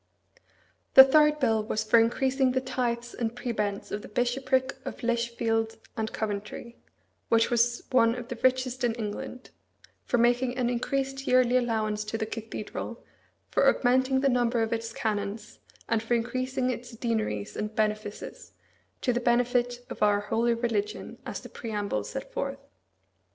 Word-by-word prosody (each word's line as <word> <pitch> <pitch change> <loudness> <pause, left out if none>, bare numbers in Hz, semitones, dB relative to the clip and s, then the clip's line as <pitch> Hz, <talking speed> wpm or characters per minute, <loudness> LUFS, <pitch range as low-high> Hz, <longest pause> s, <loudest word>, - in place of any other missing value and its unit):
The 265 - +13
third 300 +2 +4
bill 225 -5 +2
was 215 0 -1
for 220 +2 +5
increasing 260 +3 +2
the 260 - +2
tithes 240 -2 -2
and 230 -1 -3
prebends 210 -5 -3
of 210 - -3
the - - -10
Bishopric 260 +4 0
of - - -7
Lichfield 235 -1 0 0.2
and 220 -1 -2
Coventry, 215 +2 -5 0.5
which 230 +1 +3
was 240 0 +2
one 230 -2 +4
of 245 -1 -7
the 240 -1 -6
richest 255 0 +1
in 235 -2 +1
England; 230 +3 -6 0.5
for 245 - 0
making 245 +1 +2
an 245 -1 +1
increased 270 +2 -2
yearly 255 -1 +4
allowance 220 -4 0
to 215 +1 -3
the 220 - -2
cathedral, 225 +1 -6 0.5
for - - +5
augmenting 260 +1 +2
the 275 - +3
number 240 -2 +2
of 225 +1 -1
its 225 0 -3
canons, 210 -1 -3 0.3
and 230 -1 +1
for 230 +2 0
increasing 255 +2 -1
its 240 -1 -7
deaneries 215 - -2
and 210 +1 -4
benefices, 215 -1 -3 0.5
"to 250 - +1
the 240 - 0
benefit 245 0 +1
of - - -7
our 205 -1 +4
holy 230 +3 +1
religion," 220 -3 -2
as - - -5
the - - -9
preamble 205 - -3
set - - -7
forth. - - -4
235 Hz, 155 wpm, -28 LUFS, 220-250 Hz, 0.5 s, The